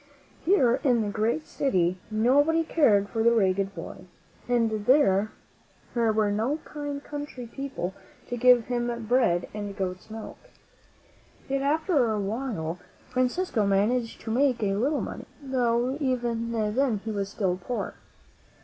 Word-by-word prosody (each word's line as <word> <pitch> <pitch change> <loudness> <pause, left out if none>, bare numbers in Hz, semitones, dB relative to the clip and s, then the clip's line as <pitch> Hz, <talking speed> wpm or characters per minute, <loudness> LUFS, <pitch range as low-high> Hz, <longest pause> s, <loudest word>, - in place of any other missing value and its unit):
Here 270 -9 +4
in 245 -5 +3
the 205 - -2
great 225 +8 0
city 185 -9 0
nobody 285 +9 +3
cared 220 -11 +3
for 225 +2 -2
the 235 +1 +5
ragged 195 -1 +1
boy, 180 - -8 0.4
and 225 -4 +1
there 215 -7 +4 0.7
were 220 -3 +2
no 225 +9 0
kind 290 -1 -5
country 290 -4 -6
people 250 -7 -5 0.3
to 245 - -3
give 245 -1 +5
him 240 -1 -2
bread 220 -8 +2
and 205 -1 -5
goat's 185 +1 -4
milk. 220 0 -8 1.1
Yet, 275 0 -1
after 290 - +2
a 215 - -1
while, 200 -6 -3 0.3
Francisco 255 - 0
managed 225 +4 +1
to 225 - -5
make 250 -1 +2
a 195 -1 +1
little 270 +9 +1
money, - - -6
though 250 -2 0
even 240 -4 -1
then 225 0 0
he 225 - -2
was 200 -2 -2
still 185 -3 -1
poor. 245 +3 -3
235 Hz, 140 wpm, -27 LUFS, 205-265 Hz, 1.1 s, the